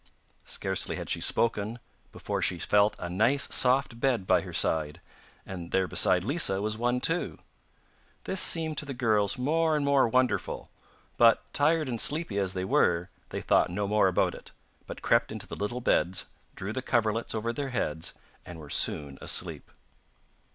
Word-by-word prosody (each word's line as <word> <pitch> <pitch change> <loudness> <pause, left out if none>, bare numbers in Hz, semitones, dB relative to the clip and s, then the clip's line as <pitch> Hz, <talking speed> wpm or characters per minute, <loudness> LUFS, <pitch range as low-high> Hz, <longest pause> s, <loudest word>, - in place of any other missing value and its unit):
Scarcely - - -2
had - - -5
she - - -1
spoken 115 0 0 0.3
before - - -4
she - - +1
felt 105 +1 +2
a 90 - -5
nice 115 +11 +2
soft 130 -2 +2
bed 120 -7 +1
by - - +3
her - - -8
side, 80 +1 -1 0.5
and 90 -3 -7
there 95 0 +1
beside 90 +2 +3
Lisa 125 - +3
was 105 +1 -1
one 120 +2 0
too. 165 +7 0 0.9
This 190 - +1
seemed 160 -3 +1
to - - -5
the 135 - -5
girls 110 -3 +1
more 160 +5 +1
and 145 -1 0
more 140 -3 +4
wonderful, 125 +2 -1 0.5
but 115 -1 +4
tired 155 +1 +2
and 120 -3 -2
sleepy 150 -10 -1
as 95 -2 -1
they 95 -1 -3
were, 85 -1 +1 0.2
they - - -5
thought - - +3
no 100 +3 -2
more 105 -1 +3
about 90 - +1
it, - - -12 0.4
but - - -9
crept 115 -1 +2
into 110 -2 -5
the - - -8
little 120 +5 -4
beds, 95 -5 +1 0.3
drew 100 +3 -5
the 130 - -3
coverlets 115 -2 0
over 115 +2 -2
their 140 +1 -4
heads 80 - -3 0.3
and 85 - -10
were 75 -3 -11
soon 70 -2 -1
asleep. - - -2
115 Hz, 170 wpm, -28 LUFS, 95-130 Hz, 0.9 s, more